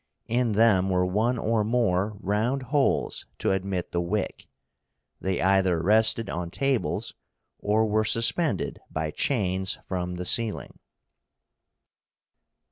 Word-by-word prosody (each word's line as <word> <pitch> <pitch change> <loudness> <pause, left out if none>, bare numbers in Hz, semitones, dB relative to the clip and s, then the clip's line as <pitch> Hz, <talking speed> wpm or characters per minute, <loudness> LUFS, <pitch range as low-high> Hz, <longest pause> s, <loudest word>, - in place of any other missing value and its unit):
In 120 -1 0
them 100 -3 +4
were 90 -1 +2
one 110 +7 +1
or 110 -1 +1
more 105 -3 0
round 110 +7 0
holes 145 -2 +1
to - - 0
admit 95 -2 -2
the 85 - 0
wick. 95 +3 -3 0.7
They 95 -1 -1
either 95 -2 +3
rested 110 +4 +3
on 85 -2 -4
tables, 135 +5 -1 0.5
or 110 +2 +2
were 110 0 +1
suspended 115 - 0
by 80 0 -3
chains 95 - 0
from 90 -1 -3
the 90 0 -5
ceiling. 110 +3 -1
105 Hz, 120 wpm, -26 LUFS, 90-115 Hz, 0.7 s, them